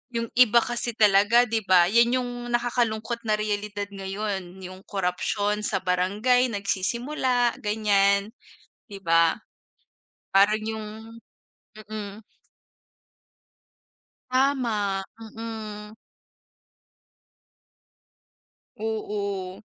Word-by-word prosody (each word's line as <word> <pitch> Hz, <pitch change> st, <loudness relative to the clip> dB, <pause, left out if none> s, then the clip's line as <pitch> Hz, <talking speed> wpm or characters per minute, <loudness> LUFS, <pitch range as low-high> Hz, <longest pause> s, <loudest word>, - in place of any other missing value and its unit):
Yung 230 Hz, -1 st, -2 dB
iba 240 Hz, -1 st, +6 dB
kasi 240 Hz, -1 st, -3 dB
talaga, 210 Hz, +3 st, +5 dB
di 225 Hz, -1 st, 0 dB
ba, 180 Hz, -2 st, +6 dB
yan 235 Hz, +2 st, +4 dB
yung 245 Hz, 0 st, -4 dB, 0.2 s
nakakalungkot 235 Hz, -1 st, -1 dB
na 215 Hz, -, +3 dB
realidad 205 Hz, -1 st, -3 dB
ngayon. 195 Hz, -1 st, -5 dB
Yung 185 Hz, +1 st, -9 dB
korapsiyon 205 Hz, +2 st, -1 dB
sa -, -, -1 dB
barangay 205 Hz, +8 st, +2 dB
nagsisimula 240 Hz, +5 st, 0 dB
ganyan, 205 Hz, -1 st, +2 dB, 0.6 s
'di 200 Hz, -, -7 dB
ba? 165 Hz, 0 st, +4 dB, 1.0 s
Parang 205 Hz, +2 st, +4 dB
yung 220 Hz, -1 st, -4 dB, 0.9 s
mm. 215 Hz, -1 st, -8 dB, 2.1 s
Tama, 240 Hz, -7 st, +1 dB, 0.2 s
mm. 220 Hz, -1 st, -8 dB, 2.8 s
Oo. 200 Hz, -3 st, -4 dB
210 Hz, 80 wpm, -25 LUFS, 200-235 Hz, 2.8 s, iba